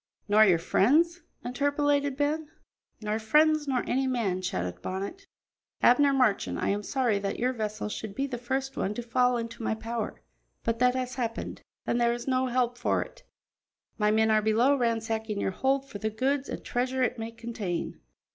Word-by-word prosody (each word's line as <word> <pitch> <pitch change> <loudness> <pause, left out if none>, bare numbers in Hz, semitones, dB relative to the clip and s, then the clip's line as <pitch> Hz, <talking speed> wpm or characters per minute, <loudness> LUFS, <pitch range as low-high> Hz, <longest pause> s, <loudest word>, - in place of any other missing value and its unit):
"Nor 215 +1 +6
your 180 -4 +5
friends?" 310 - +3 0.2
interpolated 285 +1 +1
Ben. 295 +1 0 0.5
"Nor 215 +1 -1
friends 300 +6 +3
nor 260 -3 +1
any 265 +1 0
man," 215 -8 0
shouted 90 - -3
Bonnet. 200 - -5 0.6
"Abner 280 +4 +6
Marchand, 255 -7 +2
I - - 0
am 205 +1 0
sorry 235 -2 0
that 200 0 -3
your 255 +2 0
vessel 215 -3 -3
should 210 -1 -6
be 275 - 0
the 250 -4 -5
first 265 +2 -2
one 205 +2 -2
to 240 - -4
fall 250 +1 +2
into 230 0 -5
my 220 - 0
power, 225 0 -4 0.4
but 230 0 -1
that 250 0 +4
has 255 -1 -2
happened, 235 -3 -4 0.2
and 240 - 0
there 235 0 +3
is 240 +2 -6
no 260 0 +2
help 245 -1 0
for - - +1
it. - - -17 0.8
My 210 0 +3
men 220 +1 +3
are 215 0 +4
below 230 +6 +3
ransacking 225 -3 -1
your 195 - 0
hold 270 +6 0
for 205 - -8
the 220 - -1
goods 265 +5 -1
and - - -6
treasure 255 +1 0
it 250 -1 -1
may 225 0 -4
contain. 230 -6 -4
240 Hz, 185 wpm, -28 LUFS, 215-265 Hz, 0.8 s, Nor